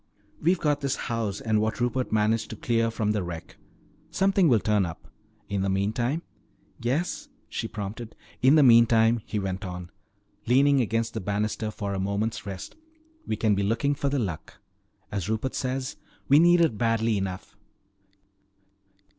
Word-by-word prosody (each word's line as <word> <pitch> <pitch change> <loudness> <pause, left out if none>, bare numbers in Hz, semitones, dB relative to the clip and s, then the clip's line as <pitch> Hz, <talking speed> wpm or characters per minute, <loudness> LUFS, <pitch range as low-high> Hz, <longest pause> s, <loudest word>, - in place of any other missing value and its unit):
We've 175 +4 +3
got 145 -2 +1
this 140 -2 0
house 110 -4 -3
and 110 -1 +1
what 110 +2 -1
Rupert 125 +1 -1
managed 110 +1 +1
to - - -6
clear 115 +1 +1
from 110 -2 -1
the 105 -1 0
wreck. 85 -2 -7 0.5
Something 195 -2 +3
will 125 -6 +5
turn 105 -1 +2
up. 85 -3 -7 0.4
In 100 -1 -2
the 95 - 0
meantime 115 - 0 0.3
" - - -27
"Yes?" 175 - -2 0.2
she 115 - -4
prompted. 105 +2 -6 0.3
"In 130 +4 +6
the 155 - +6
meantime," 115 -2 +5
he 105 - -3
went 95 0 -3
on, 90 -2 -7 0.6
leaning 135 +3 +4
against 115 0 -1
the 110 - -3
banister 105 +2 -2
for 100 -2 -4
a 95 - -2
moment's 105 +3 -2
rest, 95 -1 -7 0.5
"we 110 - 0
can 110 0 +2
be 100 - 0
looking 115 +8 +1
for 140 0 -1
the 140 - 0
Luck. 95 - -4 0.5
As 100 -1 -3
Rupert 110 +4 -1
says, 130 0 -3 0.3
we 140 +2 +6
need 175 +1 +6
it 120 -11 +2
badly 115 -1 +1
enough. 95 -2 -4
110 Hz, 165 wpm, -26 LUFS, 100-130 Hz, 0.6 s, In